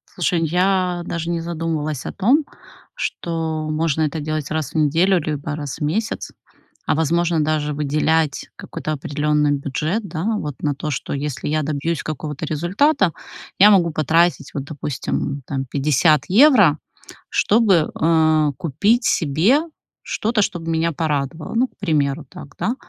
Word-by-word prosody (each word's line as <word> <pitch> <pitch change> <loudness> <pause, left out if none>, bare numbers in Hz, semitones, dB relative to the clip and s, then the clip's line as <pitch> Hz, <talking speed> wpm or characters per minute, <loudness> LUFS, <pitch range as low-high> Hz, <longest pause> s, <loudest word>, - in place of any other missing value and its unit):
Слушай, 170 -2 +1
я 180 +1 +1
даже 170 -1 -4
не 170 -1 -1
задумалась 160 -4 -3
о - - -3
том, 260 +10 +2 0.5
что 160 -2 -3
можно 155 0 0
это 155 +1 -1
делать 155 -1 -3
раз 155 -3 -2
в - - -20
неделю 165 +5 +3
либо 150 -1 -3
раз 145 -3 -5
в - - -17
месяц, 210 +10 -2 0.5
а - - +1
возможно, 165 +1 +1
даже 150 -1 -1
выделять 150 +1 0
какой-то 155 - -5
определённый 150 +1 0
бюджет, 150 +9 -2
да, 160 0 -4
вот, 150 -7 -4
на 145 -2 0
то, 150 +2 -5
что 140 - -3
если 140 0 -3
я 155 0 +1
добьюсь 155 +2 -2
какого-то 155 0 -5
результата, 180 - +1 0.5
я 205 +2 +9
могу 175 -4 +4
потратить, 160 0 +1
вот, 140 - -3
допустим, 145 -1 -3
там 135 -1 -3
50 145 +2 +2
евро, 205 - +6 0.5
чтобы, 200 -7 +3
а, 155 -2 +3
купить 205 - +1
себе 170 - +3 0.4
что-то, 220 0 0
что 180 -3 -1
б 165 0 -6
меня 165 +1 0
порадовало. 150 0 -2
Ну, 250 +3 +3
к - - -35
примеру 150 -5 0
так, 140 - -12
да, 235 - -1
155 Hz, 150 wpm, -20 LUFS, 150-175 Hz, 0.5 s, я